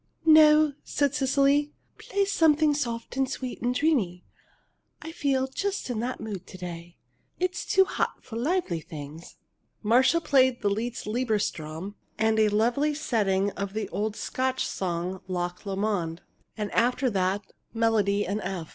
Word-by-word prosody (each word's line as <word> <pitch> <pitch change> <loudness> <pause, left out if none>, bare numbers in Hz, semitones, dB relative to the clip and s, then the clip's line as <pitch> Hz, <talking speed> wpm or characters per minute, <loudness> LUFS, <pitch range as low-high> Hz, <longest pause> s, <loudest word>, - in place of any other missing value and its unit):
"No," 310 -1 +7
said 285 -2 0
Cecily. 280 +2 +2 0.3
"Play 400 0 0
something 315 -5 +3
soft 240 -4 -3
and 270 -1 +1
sweet 255 -2 -5
and 245 +1 0
dreamy. 230 - +1 0.7
I 325 - -8
feel 275 -5 0
just 385 +3 -3
in 230 - -2
that 245 +3 -3
mood 205 -4 -6
to 185 - -10
day. 175 -1 -8 0.4
It's 365 0 -2
too 385 -1 +5
hot 375 - -2
for 225 - -9
lively 260 - 0
things." 155 +1 -10 0.5
Marcia 250 +9 +4
played 260 -5 +3
the 205 - +2
Liszt 230 +4 -3
"Liebestraum," 205 -6 -2 0.2
and 220 0 +2
a 215 -1 +4
lovely 245 +8 +1
setting 205 -8 +1
of 200 0 -5
the 220 - -2
old 215 0 -2
Scotch 260 +2 -1
song 180 0 -3
"Loch 180 +1 -4
Lomond," 195 -4 -2 0.3
and 210 -2 -3
after 250 +3 +2
that 190 +1 0
the - - -28 0.2
"Melody 215 -3 +1
in 205 +3 -2
F." 180 -4 -4
225 Hz, 150 wpm, -27 LUFS, 195-280 Hz, 0.7 s, No